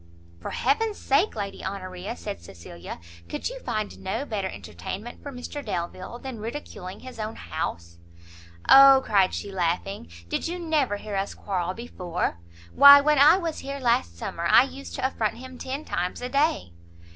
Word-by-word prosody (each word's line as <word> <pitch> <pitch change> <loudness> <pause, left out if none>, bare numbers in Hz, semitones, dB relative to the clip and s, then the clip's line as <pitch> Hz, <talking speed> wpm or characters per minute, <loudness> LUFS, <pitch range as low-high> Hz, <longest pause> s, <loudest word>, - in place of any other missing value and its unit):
"For - - -5
heaven's 415 - 0
sake, 305 +10 +2
Lady 200 -1 -5
Honoria," 185 -1 -5
said 85 0 -6
Cecilia, 85 0 -10 0.3
"could - - -3
you - - -8
find 215 - -3
no 190 +9 -3
better 200 -7 -2
entertainment 100 - -7
for 285 - -7
Mr 275 +3 -7
Delvile 185 +6 -4
than 255 -2 -7
ridiculing 210 -5 -7
his 255 -3 -10
own 215 +1 -4
house?" 85 - -5 0.7
"O," 270 -1 +9
cried 195 -3 +3
she, 200 - -5
laughing, 175 - -2 0.2
"did - - -2
you 350 +2 -3
never 310 -11 0
hear 205 0 -6
us 195 +1 -2
quarrel 185 -2 -2
before? 180 - -3 0.3
why 280 0 +10
when 300 0 +3
I 305 +5 +8
was 335 -4 -3
here 275 +1 -5
last 160 - +1
summer, 170 - -3
I 245 - +7
used 275 +1 -8
to 260 - -2
affront 225 -4 -1
him 255 0 -10
ten 275 +4 -5
times 180 +1 -2
a 250 - -3
day." 280 - +1
215 Hz, 170 wpm, -26 LUFS, 180-275 Hz, 0.7 s, why